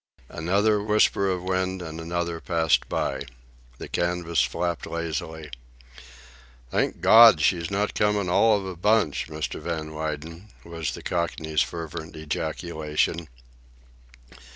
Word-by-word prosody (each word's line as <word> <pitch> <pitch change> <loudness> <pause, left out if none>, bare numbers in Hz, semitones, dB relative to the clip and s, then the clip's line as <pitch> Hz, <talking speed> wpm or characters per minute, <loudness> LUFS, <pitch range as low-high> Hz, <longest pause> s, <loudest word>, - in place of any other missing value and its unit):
Another 100 +6 +1
whisper 105 -2 +2
of 90 -1 -2
wind, 95 0 -1
and 80 0 -7
another, 85 0 -3
passed 80 -3 +1
by. 65 0 -1 0.6
The - - -7
canvas 85 -3 0
flapped 85 +7 -2
lazily. 80 -2 -4 1.2
"Thank - - 0
Gawd 115 -6 +8
she's 85 +1 +1
not 100 +2 -1
comin' 105 -2 +1
all 105 +4 +4
of 100 - -5
a 95 -1 -5
bunch, 105 -4 +1
Mr. 75 -1 -5
Van 80 -1 -4
Weyden," 80 +4 -5 0.2
was 85 -2 -4
the - - -10
Cockney's 80 -3 -1
fervent 80 -1 -5
ejaculation. 80 +1 -2
85 Hz, 120 wpm, -25 LUFS, 80-95 Hz, 1.2 s, Gawd